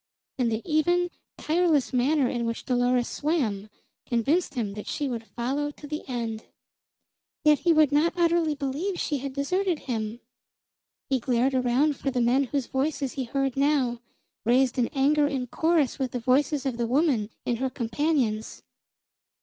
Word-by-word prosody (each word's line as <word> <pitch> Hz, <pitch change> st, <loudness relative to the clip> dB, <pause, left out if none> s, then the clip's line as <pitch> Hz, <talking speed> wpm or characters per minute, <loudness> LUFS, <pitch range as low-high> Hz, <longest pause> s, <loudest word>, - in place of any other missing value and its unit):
And 240 Hz, -2 st, +2 dB
the 220 Hz, +1 st, -2 dB
even, 350 Hz, +3 st, +2 dB, 0.3 s
tireless 315 Hz, -4 st, +1 dB
manner 265 Hz, +2 st, +2 dB
in 240 Hz, -1 st, -2 dB
which 230 Hz, -, -4 dB
Dolores 245 Hz, -1 st, +2 dB
swam 225 Hz, -10 st, -1 dB, 0.4 s
convinced 280 Hz, +9 st, +1 dB
him 215 Hz, -5 st, -2 dB
that 210 Hz, 0 st, -8 dB
she 290 Hz, -, -2 dB
would 235 Hz, -3 st, -4 dB
follow 265 Hz, +6 st, -2 dB
to 295 Hz, -, -11 dB
the 300 Hz, +1 st, -5 dB
end. 230 Hz, -3 st, -3 dB, 1.0 s
Yet 300 Hz, -2 st, +5 dB
he 345 Hz, -, +2 dB
would 310 Hz, -3 st, +4 dB
not 320 Hz, +5 st, +2 dB
utterly 335 Hz, -3 st, +2 dB
believe 290 Hz, +7 st, -3 dB
she 290 Hz, -2 st, -1 dB
had 275 Hz, +1 st, -4 dB
deserted 355 Hz, +6 st, 0 dB
him. 225 Hz, -2 st, -3 dB, 0.9 s
He 265 Hz, -, +3 dB
glared 250 Hz, +2 st, +1 dB
around 260 Hz, +3 st, +2 dB
for 275 Hz, -, -2 dB
the 255 Hz, -2 st, -1 dB
men 250 Hz, +4 st, +3 dB
whose 275 Hz, 0 st, -2 dB
voices 275 Hz, 0 st, -1 dB
he 265 Hz, -2 st, -3 dB
heard 270 Hz, +1 st, -1 dB
now, 270 Hz, -4 st, +1 dB, 0.4 s
raised 250 Hz, +2 st, +2 dB
in 240 Hz, -, +2 dB
anger 290 Hz, +2 st, +2 dB
in 270 Hz, -3 st, -2 dB
chorus 315 Hz, +1 st, +1 dB
with 260 Hz, -2 st, -2 dB
the 250 Hz, -, -1 dB
voices 270 Hz, +3 st, +1 dB
of 255 Hz, -3 st, -1 dB
the 235 Hz, -1 st, -1 dB
woman 255 Hz, -5 st, +2 dB, 0.2 s
and 235 Hz, -2 st, -1 dB
her 265 Hz, 0 st, 0 dB
companions. 235 Hz, -2 st, -1 dB
270 Hz, 165 wpm, -26 LUFS, 240-300 Hz, 1.0 s, Yet